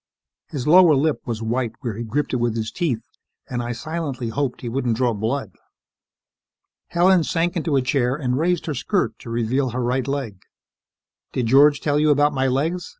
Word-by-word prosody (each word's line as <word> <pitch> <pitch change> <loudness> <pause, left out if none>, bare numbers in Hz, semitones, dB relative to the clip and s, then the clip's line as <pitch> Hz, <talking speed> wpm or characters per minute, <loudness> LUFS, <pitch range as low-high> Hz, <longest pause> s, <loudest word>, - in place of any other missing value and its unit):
His 135 -4 -4
lower 170 -1 +7
lip 150 +2 +1
was 115 -2 -3
white 115 0 -1
where 120 -6 -3
he 115 - -4
gripped 140 +7 -2
it - - +2
with 120 -2 0
his 110 -1 -3
teeth 130 -11 -2 0.4
and 125 -1 -3
I 120 0 -3
silently 135 -1 -4
hoped 125 +2 -2
he 120 - -5
wouldn't 120 -2 -1
draw 125 -2 +1
blood. 110 +1 -2 1.4
Helen 180 0 +3
sank 170 +2 -1
into 160 -3 0
a 135 - +2
chair 125 -1 +1
and 130 -4 -1
raised 170 +4 0
her 155 - -2
skirt 130 - -1
to - - -10
reveal 120 +3 0
her 125 +1 -3
right 125 +2 -1
leg. 135 -9 -4 0.9
"Did 125 - -1
George 140 +4 +5
tell 145 -1 +1
you 155 0 +3
about 145 0 +3
my 135 -1 +1
legs?" 160 +7 -1
130 Hz, 190 wpm, -22 LUFS, 120-150 Hz, 1.4 s, lower